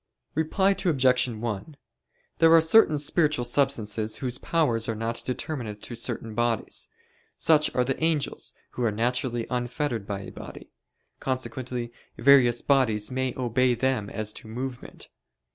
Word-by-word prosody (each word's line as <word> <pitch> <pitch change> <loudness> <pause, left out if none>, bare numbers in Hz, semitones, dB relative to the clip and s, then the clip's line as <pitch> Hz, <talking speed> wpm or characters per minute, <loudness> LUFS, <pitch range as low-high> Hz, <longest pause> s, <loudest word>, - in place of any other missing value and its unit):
Reply 160 +5 +2
Obj. 130 -10 +2
1: 115 +4 -5 0.6
There 165 -1 +6
are - - +8
certain 160 -1 +5
spiritual 150 -3 +1
substances 115 -5 0
whose 125 -1 -4
powers 120 -10 +1
are 115 - -1
not 115 +1 -3
determinate 125 -5 -5
to - - -6
certain 115 -1 -4
bodies; 120 -1 -1 0.5
such 155 -2 +4
are 125 - +3
the 135 +4 -2
angels 160 -3 -1 0.2
who 125 - -4
are 115 - +3
naturally 120 +1 -1
unfettered 125 -3 -2
by 100 -1 -4
a - - -9
body; - - -11 0.5
consequently 130 -2 -3 0.3
various 125 -3 +5
bodies 110 -6 +2
may 130 -1 -1
obey 125 0 +2
them 125 -5 0
as 110 -1 -4
to - - -9
movement. 125 +2 -6
125 Hz, 140 wpm, -26 LUFS, 115-140 Hz, 0.6 s, are